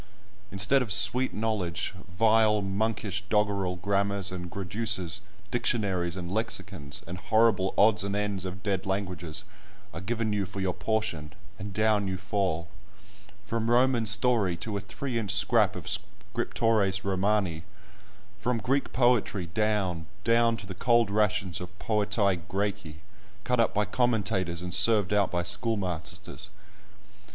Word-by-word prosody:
Instead 115 +8 +3
of 120 -6 -3
sweet 100 +7 +3
knowledge, 105 -7 -2 0.2
vile, 110 -1 +4
monkish, 105 0 -2
doggerel 100 -3 +1
grammars 100 +1 0
and 90 -1 -5
graduses, 100 -1 -2 0.3
dictionaries 95 -8 0
and 90 -1 -5
lexicons, 95 -9 -3
and 90 +2 -7
horrible 110 -1 +3
odds 105 -1 +5
and 100 0 -2
ends 105 -2 -2
of 95 -1 -6
dead 95 -2 -1
languages, 90 -5 -2 0.5
are 85 - -6
given 110 +2 -1
you 100 -1 0
for 100 0 -7
your 95 -2 0
portion, 110 -11 -2 0.3
and 100 +1 -6
down 105 0 +2
you 95 0 -2
fall, 95 -4 -1 0.8
from 115 +1 -1
Roman 120 -1 +3
story 105 -4 +2
to 105 +3 -5
a 100 - -2
three 120 +5 -4
inch 105 -3 -4
scrap - - +3
of - - -7
"Scriptores 105 0 0
Romani,"—from 100 +3 -3
Greek 135 +6 0
poetry 120 -7 +2
down, 100 -7 0 0.2
down 115 0 +3
to 105 - -9
the 95 - -6
cold 115 +2 +2
rations 105 -4 +1
of 90 +2 -9
"Poetæ 105 -4 +1
Græci," 100 -5 -2 0.5
cut 125 +2 0
up 115 - +2
by 105 +1 +2
commentators, 100 -9 0
and 90 -1 -4
served 105 -3 +4
out 100 -1 +3
by 90 0 -1
schoolmasters! 95 -4 -3
100 Hz, 135 wpm, -28 LUFS, 95-110 Hz, 0.8 s, odds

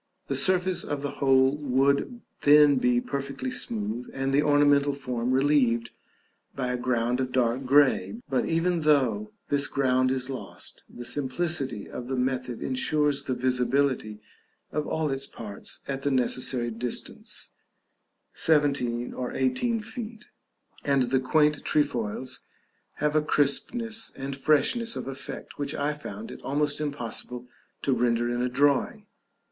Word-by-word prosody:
The - - 0
surface 185 -1 +2
of 145 -1 -4
the 145 - -5
whole 135 0 +4
would 140 - +1 0.2
then 145 -1 +7
be 125 -1 +3
perfectly 140 -1 -4
smooth, 110 +2 -3
and 135 0 -1
the 140 - +5
ornamental 145 -1 +4
form 125 -3 -3
relieved 130 -4 +2 0.6
by 125 -2 -1
a 125 - -1
ground 120 0 0
of 130 -1 -1
dark 125 +1 +1
grey; 145 - +3
but, 130 - 0
even 170 +1 +1
though 125 -9 +2 0.2
this 145 0 +2
ground 130 -1 +2
is 130 -1 -1
lost, 135 -1 -7
the 120 - -9
simplicity 135 -2 -1
of 120 - -7
the 130 - -2
method 125 -1 -2
insures 140 +2 +1
the 130 - -1
visibility 125 -3 0 0.5
of 150 0 -2
all 155 -2 -1
its 135 0 -2
parts 105 -3 -5
at 135 -1 -3
the 145 - 0
necessary 125 -2 0
distance 115 +2 -5 0.8
(17 140 -6 +1
or 125 -1 -4
18 175 - +1
feet), 225 0 -7 0.6
and 135 -3 +2
the 130 - +4
quaint 150 +3 +2
trefoils 125 -3 -1 0.5
have 150 +1 -1
a 155 - +5
crispness 225 - 0
and 135 0 -5
freshness 155 - +2
of - - -5
effect 135 +1 -7
which 145 +1 -2
I 145 +1 0
found 210 +9 -8
it - - -10
almost 145 +2 -1
impossible 125 -3 -3 0.4
to 135 - +2
render 120 -1 +1
in 120 - -1
a 125 - 0
drawing. 140 +2 +1
135 Hz, 140 wpm, -27 LUFS, 125-145 Hz, 0.8 s, then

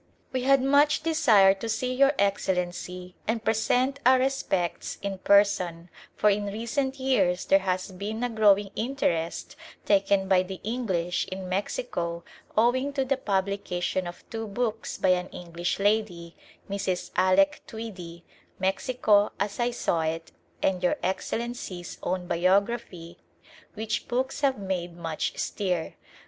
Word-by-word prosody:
We 255 - 0
had 270 0 +4
much 285 +3 +4
desire 245 -13 +5
to 210 +4 -6
see 250 +3 -1
Your 275 +2 +4
Excellency 180 -2 -1
and 225 0 -1
present 250 +5 +1
our 260 +1 +6
respects 255 -9 -1
in 195 -1 -3
person, 185 -4 +2 0.2
for 210 - +4
in 205 +1 0
recent 235 +6 -2
years 250 -9 +1
there 195 - +5
has 185 0 -2
been 210 +5 -4
a 245 - 0
growing 205 -3 +3
interest 215 -10 -2 0.3
taken 195 -1 +3
by 190 -1 +4
the 185 0 -6
English 190 -7 -1
in 185 0 -6
Mexico 175 -3 -3 0.3
owing 255 +5 +2
to 270 -2 0
the 275 +1 +1
publication 190 -5 -1
of 175 - -10
two 225 -1 -4
books 225 +1 -3
by 190 - +1
an 180 0 +2
English 175 0 -4
lady, 200 -5 0 0.3
Mrs. 195 -2 -2
Alec 240 +12 +3
Tweedie, 185 -8 -8 0.3
Mexico 205 +2 +2
As 200 +3 -2
I 240 0 +2
Saw 175 -8 0
It 160 +1 -3 0.3
and 185 -2 +1
Your 180 - +2
Excellency's 190 -2 -4
own 180 0 -2
biography, 185 0 0 0.6
which 220 0 -3
books 260 +3 -2
have 275 -4 +2
made 180 -3 -4
much 165 -2 -3
stir. 180 -5 -2
200 Hz, 135 wpm, -27 LUFS, 180-240 Hz, 0.6 s, our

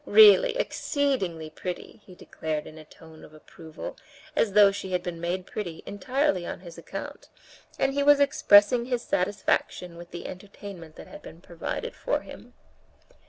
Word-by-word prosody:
Really, 460 +3 +7
exceedingly 220 - -1
pretty," 180 +6 -7
he 185 - -14
declared 155 -3 -4
in 155 - -11
a - - -11
tone 160 +1 -16
of 155 - -14
approval, 160 +1 -10 0.4
as 220 -8 +1
though 205 -1 +7
she 195 -2 -6
had 180 -1 0
been 170 -2 -5
made 180 +2 -2
pretty 175 -7 -6
entirely 225 -2 0
on 175 - -6
his 170 -3 -11
account, - - -8 0.5
and 270 0 +1
he 285 - 0
was 290 0 +6
expressing 235 -4 +5
his 245 -1 -2
satisfaction 180 -2 -1
with 175 0 -11
the 175 - -8
entertainment 185 -4 -10
that - - -11
had - - -12
been 165 - -12
provided 170 -1 -5
for - - -1
him. - - -13
190 Hz, 165 wpm, -27 LUFS, 170-245 Hz, 0.5 s, Really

